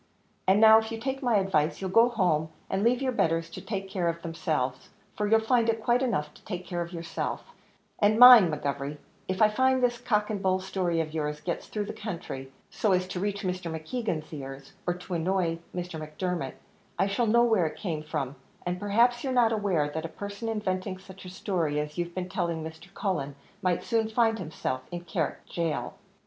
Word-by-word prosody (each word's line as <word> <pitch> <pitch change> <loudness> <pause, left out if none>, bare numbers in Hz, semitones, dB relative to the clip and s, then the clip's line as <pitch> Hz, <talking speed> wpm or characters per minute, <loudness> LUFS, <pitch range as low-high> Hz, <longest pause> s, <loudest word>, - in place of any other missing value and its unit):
And 190 +2 +5
now, 220 0 +9
if 220 0 -5
you'd 225 0 -5
take 270 0 -2
my 245 -4 +2
advice, 190 -6 +1
you'll 190 -1 -3
go 230 +4 +6
home, 175 -9 +1 0.2
and 195 - 0
leave 240 +4 +2
your 260 - +1
betters 165 -7 0
to 185 - -7
take 195 0 -4
care 180 -3 0
of 170 0 -4
themselves, 150 -6 -2 0.3
for 210 - 0
you'll 225 +1 +5
find 230 0 +2
it 225 -1 0
quite 240 +2 +3
enough 150 - -1
to - - -19
take 180 -3 -5
care 175 -2 -3
of 170 0 -5
yourself; 165 - -4 0.5
and 210 +1 +4
mind, 245 -8 +10
McGovery, 140 0 -3 0.3
if 185 +3 +2
I 215 - +7
find 260 +3 +2
this 240 -1 +2
cock 210 -3 0
and 205 -2 -3
bull 185 -1 +2
story 185 -3 -1
of 155 -1 -5
yours 150 -1 -2
gets 170 +2 -4
through 210 -1 -3
the - - -5
country, 165 -10 -6 0.2
so 210 -3 +1
as 185 0 +1
to 180 - -3
reach 200 +2 -2
Mr. 180 -2 -2
Keegan's 165 -8 -3
ears, 135 +1 -8
or 175 - +1
to 180 +1 -8
annoy 170 -1 0
Mr. 180 -2 -5
Macdermot, 155 -1 -3 0.4
I - - +3
shall 200 +4 0
know 235 +2 +5
where 220 -8 +3
it 155 - -7
came 165 -7 -3
from; 150 -4 -3 0.3
and 180 0 -2
perhaps 235 +5 +3
you're 265 - -1
not 240 -3 +4
aware, 195 -8 +1
that 160 +2 -4
a 165 - -4
person 200 +5 -6
inventing 185 -3 -2
such 190 0 -13
a - - -7
story 170 -6 -1
as 150 +2 -4
you've 175 0 -3
been 185 -1 -3
telling 170 -4 -2
Mr. 160 +3 -9
Cullen, 150 -8 -2 0.3
might 180 -3 +1
soon 225 -2 +1
find 225 0 +2
himself 155 -6 -3
in 175 0 -4
Carrick 160 -3 -2
Gaol." 165 -3 -1
185 Hz, 210 wpm, -28 LUFS, 165-215 Hz, 0.5 s, mind